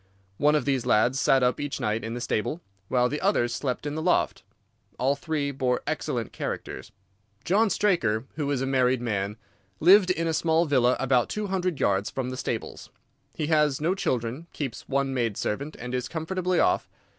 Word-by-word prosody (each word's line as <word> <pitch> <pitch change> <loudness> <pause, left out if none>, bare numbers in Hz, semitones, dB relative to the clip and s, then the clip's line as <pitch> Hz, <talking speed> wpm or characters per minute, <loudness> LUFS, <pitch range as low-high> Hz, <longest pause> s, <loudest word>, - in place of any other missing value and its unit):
One 150 +1 +4
of 150 - +1
these 135 -3 0
lads 125 +4 +3
sat 135 -1 +4
up 125 0 +2
each 145 -1 -3
night 110 +1 -1
in 115 +1 -4
the 120 - -5
stable, 120 +8 -1 0.3
while 125 +2 +2
the 150 +4 -3
others 120 - +2
slept 125 +2 -3
in 145 - -2
the 155 - -3
loft. - - +1 0.6
All 135 +3 +2
three 145 -1 -2
bore 130 -2 -1
excellent - - -2
characters. - - -5 0.5
John 210 +4 +3
Straker, 130 - +1
who 145 -3 -2
is 140 -3 0
a - - 0
married 130 -1 +2
man, 105 -3 -2 0.4
lived 185 +3 +6
in 165 -2 0
a 165 - 0
small 160 +1 +2
villa 130 -4 +3
about 125 -2 +2
two 210 0 -3
hundred 185 -5 -1
yards 95 +1 +1
from 130 -1 -3
the - - -4
stables. - - -4 0.5
He 155 - -2
has 150 -3 +3
no 165 +4 +1
children, 140 -5 -2
keeps 135 -6 -5
one 140 0 0
maid 115 -5 -1
servant, 140 +9 -3
and 125 +1 -6
is 125 -1 -1
comfortably 180 +2 -1
off. - - +2
135 Hz, 190 wpm, -26 LUFS, 125-160 Hz, 0.6 s, lived